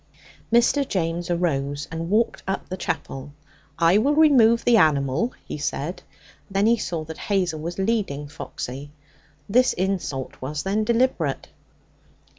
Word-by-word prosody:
Mr. 240 +4 +3
James 170 -1 -2
arose 145 -5 -1
and 165 +1 -4
walked 220 +3 +1
up 195 - -2
the 185 - -3
chapel. 135 -5 -4 0.5
'I 170 +4 +4
will 280 +6 +2
remove 250 -7 +5
the 240 - +5
animal' 155 - +2
he - - -6
said; 150 +4 -3 0.5
then 195 +1 +1
he 230 +2 +5
saw 170 -7 -3
that 160 0 -9
Hazel 180 -6 0
was 170 +3 -5
leading 190 -9 -1
Foxy. 145 -2 -7 0.6
This 250 +5 +3
insult 180 -8 -3
was, 145 +3 -4
then, 205 +3 0
deliberate. 240 +3 0
175 Hz, 135 wpm, -24 LUFS, 150-220 Hz, 0.6 s, remove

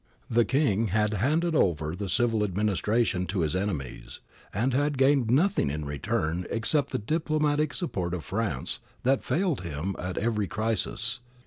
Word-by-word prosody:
The 120 0 +4
King 125 -6 +2
had 105 +2 +1
handed 155 - +1
over 80 - +1
the 100 0 -4
civil 115 +2 +2
administration 105 0 +1
to 95 0 -1
his 80 +1 0
enemies, 90 -10 -4 0.3
and 120 +6 0
had 145 +1 +1
gained 135 -3 +3
nothing 145 - +3
in 75 +1 -3
return 75 +4 -2
except 135 +5 +1
the - - -1
diplomatic 155 +3 0
support 95 - -2
of 85 - -6
France 95 - -1 0.2
that 135 +1 +2
failed 175 - 0
him 85 +3 -3
at 90 +1 -4
every 105 -2 0
crisis. 110 +3 -1
110 Hz, 150 wpm, -27 LUFS, 90-135 Hz, 0.3 s, The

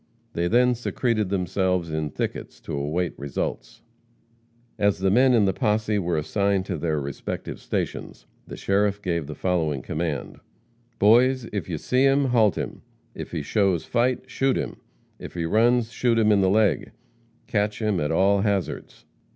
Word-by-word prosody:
They 85 +1 0
then 125 +5 +4
secreted 115 -3 -1
themselves 90 -2 0
in 80 -1 -2
thickets - - -5
to - - -7
await 75 +5 -1
results. 70 -2 -5 1.0
As 100 -1 +2
the 95 0 +1
men 125 +4 +5
in 110 -3 +4
the 95 - +1
posse 105 0 0
were 85 -3 -1
assigned 100 +4 0
to 95 -3 -3
their 80 -2 -1
respective 70 -1 -5
stations, - - -4 0.2
the - - -8
sheriff 100 +1 +1
gave 85 -6 -2
the 75 - -7
following 80 -6 -1
command: 75 -2 -4 0.6
"Boys, 125 +4 +4
if 100 -2 -3
you 80 - -2
see 125 - 0
him, 135 +1 +4
halt 110 -5 +3
him; - - -5 0.3
if - - -7
he 80 -4 -4
shows 95 0 +1
fight, 125 +1 0
shoot 135 0 0
him; - - -4 0.4
if - - -9
he 85 -1 -2
runs, 115 +5 +2
shoot 120 -2 +1
him 110 -1 +4
in 100 -1 +4
the 95 - +3
legs. 100 - +2 0.6
Catch 105 -1 -1
him, 105 -4 0
at 75 -1 -1
all 95 +4 +3
hazards." 100 -5 -3
100 Hz, 165 wpm, -24 LUFS, 85-110 Hz, 1.0 s, men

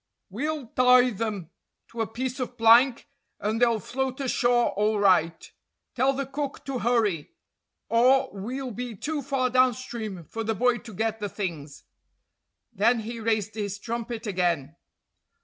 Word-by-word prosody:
We'll 295 +6 -3
tie 250 0 +5
them 205 -5 -4 0.4
to 230 0 -5
a 225 - 0
piece 255 +3 -4
of 250 -1 -4
plank, 235 +3 +5 0.3
and 215 +3 -1
they'll 235 -2 +3
float 260 +4 -3
ashore 245 -2 +2
all 210 +2 +1
right. 180 -5 +2 0.5
Tell 260 +2 +2
the 275 0 -3
cook 275 +1 -5
to 270 -2 -3
hurry, 215 -10 0 0.5
or 250 +3 +4
we'll 250 +6 -5
be 245 0 -6
too 300 +8 -3
far 265 -2 -1
downstream 240 -6 0
for 225 +8 -5
the 220 0 -1
boy 245 +3 +2
to 220 - -11
get 225 +2 -1
the 205 -1 -3
things." 155 -9 -6 0.9
Then 225 +3 +2
he 230 +2 -6
raised 220 -2 -1
his 205 -2 -4
trumpet 235 +1 -5
again. 175 -7 -1
230 Hz, 150 wpm, -26 LUFS, 205-255 Hz, 0.9 s, tie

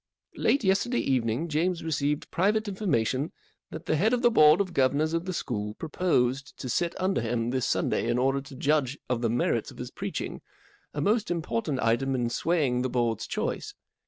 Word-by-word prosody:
44 - - -9
Late 275 - +3
yesterday 200 +6 +2
evening 125 +3 0
James 170 +3 0
received 150 -1 -1
private 210 +4 +1
information 155 - 0 0.4
that 160 - -8
the - - +1
head 215 +9 +2
of 250 0 0
the 240 - +5
Board 155 -5 +6
of 190 -3 -1
Governors 145 +4 +2
of 165 +1 -1
the 185 - -2
school 105 - -3
proposed 135 -5 0
to 130 - -6
sit 170 +7 -1
under 190 -4 +1
him 115 +1 -1
this 130 -2 0
Sunday - - 0
in - - +1
order 135 +2 +1
to 135 0 -12
judge 140 -1 +1
of 125 -2 -1
the 115 - +1
merits 120 +2 0
of - - -13
his - - -6
preaching, - - -5 0.5
a 145 - -3
most 215 +6 +1
important 145 -5 -2
item 130 +4 +1
in 120 -2 -1
swaying 140 -4 +1
the 130 - -1
Board's 120 -3 -1
choice. - - -3
145 Hz, 190 wpm, -27 LUFS, 125-175 Hz, 0.5 s, Board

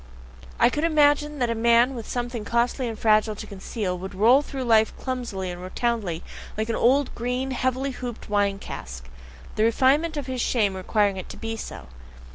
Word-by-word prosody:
I 245 - +5
could 300 - -2
imagine 295 -2 +3
that 245 -3 0
a - - +1
man 235 +3 +4
with 230 -4 -7
something 240 -2 -3
costly 240 +3 0
and 225 -2 -5
fragile 215 0 +3
to - - -7
conceal, 195 -1 -4
would 190 +1 -7
roll 235 +8 +5
through 275 -2 -5
life 220 -2 +3
clumsily 235 -8 -4
and 175 0 -8
rotundly 185 -3 -2 0.3
like 220 +1 -2
an 230 - 0
old, 265 +2 +3
green, 250 +3 -2
heavily 260 +2 -1
hooped 245 -2 -7
wine 205 -2 +1
cask: 65 - -8 0.5
the 215 - +3
refinement 275 +8 +3
of 285 - -3
his 255 -1 -3
shame 210 -6 +1
requiring 200 +1 +1
it 185 - -7
to - - -8
be 225 0 -4
so. 220 - -8
235 Hz, 185 wpm, -25 LUFS, 210-260 Hz, 0.5 s, I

